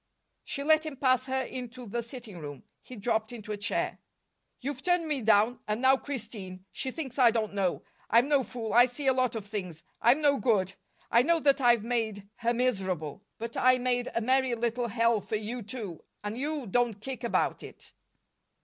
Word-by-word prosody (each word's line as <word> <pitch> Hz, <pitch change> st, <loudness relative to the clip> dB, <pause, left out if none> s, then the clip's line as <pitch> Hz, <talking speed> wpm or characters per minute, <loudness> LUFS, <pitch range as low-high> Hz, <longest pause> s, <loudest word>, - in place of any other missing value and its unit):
She 280 Hz, -, -4 dB
let 310 Hz, +1 st, +4 dB
him 310 Hz, -4 st, -6 dB
pass 255 Hz, -1 st, +2 dB
her 265 Hz, 0 st, 0 dB
into 250 Hz, -1 st, -7 dB
the 235 Hz, +3 st, -2 dB
sitting 235 Hz, -5 st, -8 dB
room. 145 Hz, -3 st, -8 dB, 0.2 s
He 255 Hz, -, -11 dB
dropped 220 Hz, 0 st, -1 dB
into 215 Hz, -3 st, -7 dB
a 210 Hz, -, -2 dB
chair. 205 Hz, +3 st, -1 dB, 0.6 s
"You've 270 Hz, 0 st, -4 dB
turned 355 Hz, -1 st, +2 dB
me 290 Hz, -4 st, -1 dB
down, 220 Hz, +2 st, +4 dB
and 210 Hz, +1 st, 0 dB
now 260 Hz, +1 st, +6 dB
Christine 215 Hz, -9 st, -6 dB
she 265 Hz, -, -3 dB
thinks 270 Hz, -2 st, -5 dB
I 245 Hz, -2 st, +8 dB
don't 220 Hz, -3 st, -1 dB
know. 195 Hz, -3 st, 0 dB, 0.3 s
I'm 235 Hz, +4 st, +5 dB
no 285 Hz, -2 st, +4 dB
fool; 230 Hz, -4 st, -5 dB
I 240 Hz, +2 st, +8 dB
see 255 Hz, +3 st, -6 dB
a 265 Hz, -, +5 dB
lot 255 Hz, -2 st, +1 dB
of 215 Hz, -3 st, -4 dB
things. 185 Hz, -6 st, -5 dB, 0.2 s
I'm 245 Hz, +6 st, +5 dB
no 285 Hz, -2 st, +4 dB
good. 195 Hz, -7 st, +1 dB, 0.4 s
I 235 Hz, -, +6 dB
know 335 Hz, +5 st, +3 dB
that 280 Hz, -1 st, +3 dB
I've 240 Hz, -3 st, +4 dB
made 220 Hz, -4 st, -2 dB
her 235 Hz, +1 st, +1 dB
miserable. 190 Hz, -, -1 dB, 0.2 s
But 230 Hz, +1 st, -6 dB
I 255 Hz, 0 st, +5 dB
made 245 Hz, 0 st, 0 dB
a 230 Hz, -, +1 dB
merry 260 Hz, +1 st, +2 dB
little 235 Hz, +1 st, -1 dB
hell 230 Hz, -1 st, +2 dB
for 210 Hz, +3 st, -3 dB
you 220 Hz, +3 st, -3 dB
too, 210 Hz, -6 st, -6 dB, 0.2 s
and 205 Hz, +1 st, -3 dB
you 290 Hz, +2 st, -2 dB
don't 230 Hz, 0 st, +1 dB
kick 260 Hz, +2 st, -6 dB
about 235 Hz, -, 0 dB
it." -, -, -12 dB
240 Hz, 195 wpm, -29 LUFS, 215-260 Hz, 0.6 s, I